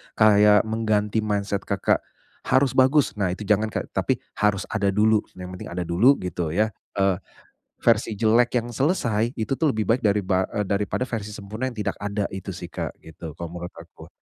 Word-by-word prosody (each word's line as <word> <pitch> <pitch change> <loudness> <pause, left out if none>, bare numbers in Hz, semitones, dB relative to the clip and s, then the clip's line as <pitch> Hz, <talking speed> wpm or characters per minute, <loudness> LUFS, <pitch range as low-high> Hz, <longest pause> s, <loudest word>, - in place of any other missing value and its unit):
kayak 105 -1 +6
mengganti 110 -1 0
mindset 100 -2 -2
Kakak, - - +1 0.5
"Harus 130 0 +3
bagus." 135 +3 +4
Nah, 95 -3 0
itu 105 - -8
jangan, 105 +2 +2
Kak, - - -5
tapi, - - +1 0.2
"Harus 105 -2 +2
ada 105 -3 0
dulu." 110 +1 +4 0.2
Yang 90 0 -8
penting - - -7
ada 90 - -1
dulu, 100 +12 +4
gitu 85 -3 -3
ya. 110 +1 +2 0.2
Eee, 95 -2 +2 0.6
versi 115 -1 +2
jelek 115 +3 +3
yang 120 0 -1
selesai, 120 - 0
itu 110 +3 -2
tuh 155 +3 +1
lebih 110 -4 0
baik 115 +6 +2
dariba 100 -4 +1
e 105 - -2
daripada 100 +5 -1
versi 115 -5 -4
sempurna 105 +4 -5
yang 120 - -9
tidak 105 - -1
ada, 100 0 -2
itu 95 0 -7
sih, 90 -2 -6
Kak, - - -4
gitu, 80 -1 -9
kalau 85 -1 -6
menurut 90 0 -6
aku. 85 0 -13
105 Hz, 185 wpm, -24 LUFS, 95-115 Hz, 0.6 s, kayak